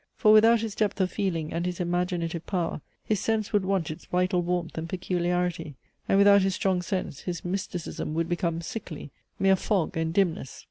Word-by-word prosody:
For 215 -2 +5
without 225 +1 +6
his 225 -2 -3
depth 210 0 -1
of 185 -1 +1
feeling 170 -6 -2
and 170 +1 -1
his 180 -1 -3
imaginative 175 -1 -1
power 175 -5 -2 0.2
his 215 -3 0
sense 220 +1 -1
would 205 -2 +3
want 185 -5 0
its 155 - -9
vital 180 0 +1
warmth 175 -1 -2
and 165 +1 -4
peculiarity; 175 -3 -1 0.3
and 195 - +4
without 200 0 +7
his 190 0 +1
strong 185 -1 +1
sense, 180 -7 -3
his 175 -2 -5
mysticism 175 -4 -4
would 165 0 0
become 170 -1 -1
sickly 170 - -7 0.3
mere 195 0 +4
fog, 190 -2 -1
and 160 0 0
dimness! 165 -7 0
180 Hz, 185 wpm, -27 LUFS, 170-195 Hz, 0.3 s, without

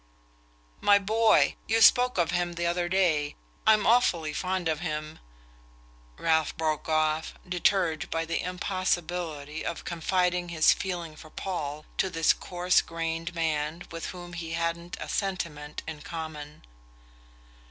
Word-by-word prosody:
"My 205 0 +6
boy...you 220 +2 +3
spoke 250 +1 +6
of 170 -1 +2
him 175 0 0
the 170 0 -2
other 175 0 0
day... 165 -6 +2 0.3
I'm 215 -2 +5
awfully 175 -10 +3
fond 185 +1 -1
of 155 -2 0
him 155 -2 -4 0.5
" - - -28 0.2
Ralph 160 -2 +1
broke 155 -1 -1
off, 155 0 +1
deterred 180 -2 +1
by 165 0 -1
the 165 0 -1
impossibility 175 -4 -2
of 170 - -4
confiding 180 +1 0
his 160 -2 +5
feeling 175 -4 -4
for 155 - -13
Paul 155 -5 -4
to 190 - +2
this 165 -3 +3
coarse 180 0 +1
grained 165 +1 -4
man 160 0 -1
with 165 0 -5
whom 175 -1 -8
he 165 -1 -5
hadn't 165 +1 -2
a - - -5
sentiment 170 -7 -3
in 155 -2 -6
common. 155 -2 -7
170 Hz, 135 wpm, -28 LUFS, 155-180 Hz, 0.5 s, My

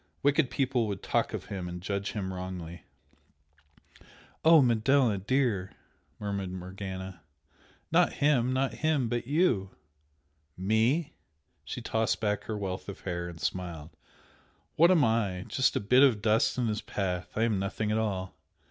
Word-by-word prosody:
wicked 140 -1 +3
people 130 -4 0
would 100 -2 -5
talk - - 0
of - - -5
him 95 -3 -5
and 90 0 -6
judge 100 +2 -3
him 95 -3 -3
wrongly 90 -2 -7 0.8
" 75 0 -26
"Oh, 160 0 +8
Manella, 120 -2 +3
dear!" 110 -3 0 0.5
murmured 100 -3 -3
Morgana 95 -1 -7 0.7
"Not - - +4
him 130 -4 +2
not 130 +1 0
him 150 -5 +1
but 120 0 -2
YOU!" 140 - +2 0.9
"Me?" 110 - +1 0.5
She - - -6
tossed 110 0 0
back 105 -1 -1
her 110 - -3
wealth 95 -1 -4
of 100 - -8
hair, 85 -2 -4
and 85 -1 -10
smiled 85 -4 -4 0.8
"What 170 +3 +6
am 175 -5 +5
I? 105 -5 0
Just 130 - +1
a - - +2
bit 125 +6 +4
of 130 -7 +5
dust 110 +3 +2
in 125 - +1
his 105 -2 -1
path! 90 -3 -3
I 110 - +1
am 110 -4 +1
nothing 105 +2 -2
at 110 - +1
all! 95 -4 -2
105 Hz, 155 wpm, -29 LUFS, 95-125 Hz, 0.9 s, Oh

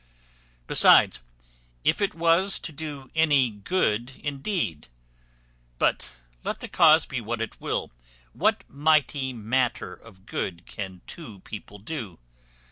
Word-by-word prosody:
Besides, 60 - +6 0.6
if - - +2
it 200 - 0
was 170 +4 +3
to 170 - -4
do 145 -3 -7
any 145 -6 +3
good 120 - -1
indeed; 140 - -2 0.9
but, - - 0 0.3
let - - -3
the - - -6
cause 160 -1 +6
be 130 -4 -4
what 115 +1 -3
it 115 - -5
will, - - -2 0.4
what - - +1
mighty 145 -2 +2
matter 120 +2 -1
of 95 -4 -17
good 85 -4 -4
can 95 -3 -7
two 115 - -10
people 105 0 -9
do? 105 - -6
130 Hz, 125 wpm, -26 LUFS, 105-160 Hz, 0.9 s, Besides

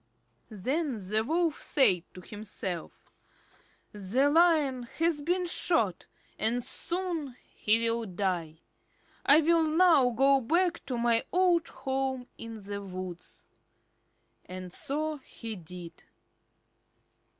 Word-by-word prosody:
Then 230 - -3
the 215 +1 +2
Wolf 325 +4 0
said 185 - +3
to 180 - -9
himself: 195 -4 -7 0.8
"The 220 +8 +1
Lion 310 -6 +4 0.2
has 330 -2 +1
been 355 +4 0
shot, 230 - 0 0.3
and 235 +3 +1
soon 335 -7 -2 0.2
he 225 +2 +1
will 230 0 -1
die. 175 -4 -3 0.7
I 295 +3 +7
will 335 +1 +4
now 320 -4 +5
go 270 +3 +4
back 340 +6 +1
to 250 - -2
my 235 -1 +3
old 355 -2 +3
home 265 -2 -3
in 225 -2 -8
the 200 0 -5
woods." 185 -2 -8 1.0
And 185 0 -8
so 305 +2 -3
he 230 -5 -8
did. 175 -1 -11
250 Hz, 110 wpm, -29 LUFS, 200-315 Hz, 1.0 s, I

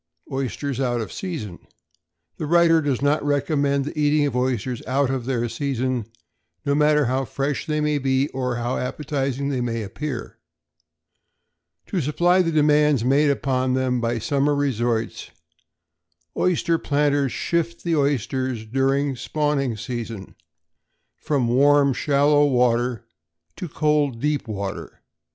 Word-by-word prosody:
=Oysters 135 0 -3
out 120 -3 0
of 110 - -5
Season.= 140 - -5 0.8
The 155 - -4
writer 170 0 +5
does 140 -3 -1
not 145 +1 +2
recommend 140 -1 +1
the 150 - -6
eating 150 0 +3
of 140 -4 -2
oysters 125 -1 -1
out 135 0 +1
of 130 -3 -3
their 120 -2 -1
season, 130 -1 -2 0.6
no 140 - +2
matter 150 0 +3
how 130 +2 0
fresh 140 +5 -3
they 150 -1 0
may 150 -1 +1
be, 135 +1 +1
or 125 -2 -2
how 120 +1 -2
appetizing 140 0 -2
they 130 -3 -1
may 115 -2 -2
appear. 120 +5 -6 1.5
To 185 - -2
supply 175 +6 +3
the 165 -2 0
demands 150 -4 +3
made 140 +3 +3
upon 130 -2 0
them 130 -2 0
by 120 0 0
summer 140 +5 +1
resorts, 120 -5 -1 1.1
oyster 170 -2 +1
planters 145 -2 +1
shift 170 +4 -2
the 170 -1 +1
oysters, 130 -4 -1
during 135 +4 +1
the 130 - -7
spawning 145 -5 -1
season, 115 -3 -6 0.8
from 140 -5 -1
warm 140 +3 +4
shallow 145 +2 +3
water 120 -2 +1 0.5
to 180 -4 -6
cold 150 -5 +1
deep 150 0 -1
water. 100 -2 -6
140 Hz, 135 wpm, -23 LUFS, 125-150 Hz, 1.5 s, writer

